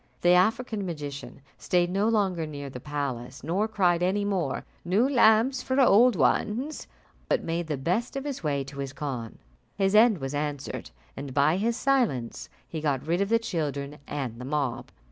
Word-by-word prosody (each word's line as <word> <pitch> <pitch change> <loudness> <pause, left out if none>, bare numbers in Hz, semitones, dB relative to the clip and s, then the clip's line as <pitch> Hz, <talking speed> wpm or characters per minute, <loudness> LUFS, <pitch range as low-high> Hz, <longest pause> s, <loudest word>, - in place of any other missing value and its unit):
The 175 - +3
African 215 +4 +2
magician 145 -6 -6 0.2
stayed 175 -1 +1
no 200 +4 +2
longer 190 -7 +1
near 145 -2 -7
the 125 - -7
palace, 135 -3 -4
nor 185 +8 0
cried 180 -5 +2
any 195 +3 +1
more, 180 -9 -1 0.2
"New 195 +9 +2
lamps 250 0 +4
for 260 +1 0
old 245 -1 +6
ones," 250 - 0 0.4
but - - +1
made 170 0 -2
the 150 -3 -2
best 180 - -1
of 275 - -3
his 285 -2 -4
way 140 -3 0
to 140 +1 -10
his 135 -1 -4
khan. 130 -6 -5 0.4
His 195 -1 +1
end 215 -1 +6
was 135 -2 -5
answered, 145 -1 -4 0.3
and 135 -1 -7
by 145 +4 +4
his 230 +4 0
silence 240 - 0 0.2
he 160 - -5
got 145 -4 -1
rid 170 +4 +1
of 200 - 0
the 230 - +5
children 150 -9 -3
and 125 -5 -4
the - - -6
mob. 140 -3 -2
170 Hz, 180 wpm, -27 LUFS, 140-215 Hz, 0.4 s, old